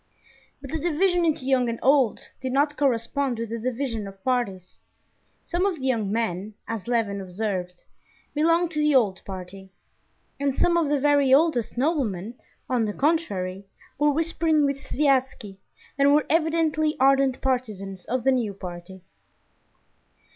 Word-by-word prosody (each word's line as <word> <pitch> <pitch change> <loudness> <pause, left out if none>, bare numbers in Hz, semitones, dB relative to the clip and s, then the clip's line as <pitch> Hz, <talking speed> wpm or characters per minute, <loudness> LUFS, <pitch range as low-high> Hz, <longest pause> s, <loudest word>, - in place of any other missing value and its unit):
But 275 -2 -9
the 320 - -2
division 350 +2 +1
into 305 -5 0
young 260 -2 +2
and 230 - -3
old 265 -4 +2
did 260 -1 -3
not 290 +3 +1
correspond 265 -1 0
with 230 -1 -4
the 230 - -3
division 235 -3 -3
of 195 0 -13
parties. 200 -8 -2 0.7
Some 350 +1 -1
of 395 -2 +1
the 270 -4 -7
young 225 -6 0
men, 210 -2 -2
as 225 -2 -5
Levin 220 -5 0
observed, 185 -2 -4 0.5
belonged 330 +3 +2
to 305 - -3
the 300 -1 +3
old 205 -7 +2
party; 190 0 -8 0.7
and 280 -2 -1
some 345 - +3
of 330 -4 +2
the 290 -1 +2
very 285 -1 +3
oldest 270 -5 +3
noblemen, 240 - -1 0.3
on 245 -3 +1
the 210 - -3
contrary, 200 - -1 0.3
were 295 0 +4
whispering 320 0 +1
with 280 -1 -1
Sviazhsky, 260 -9 0 0.4
and 280 +1 +5
were 300 - +2
evidently 315 -1 +1
ardent 270 -1 +3
partisans 210 -8 -3
of 250 0 -2
the 265 - +4
new 230 -6 -1
party. 180 0 -9
260 Hz, 150 wpm, -25 LUFS, 205-295 Hz, 0.7 s, and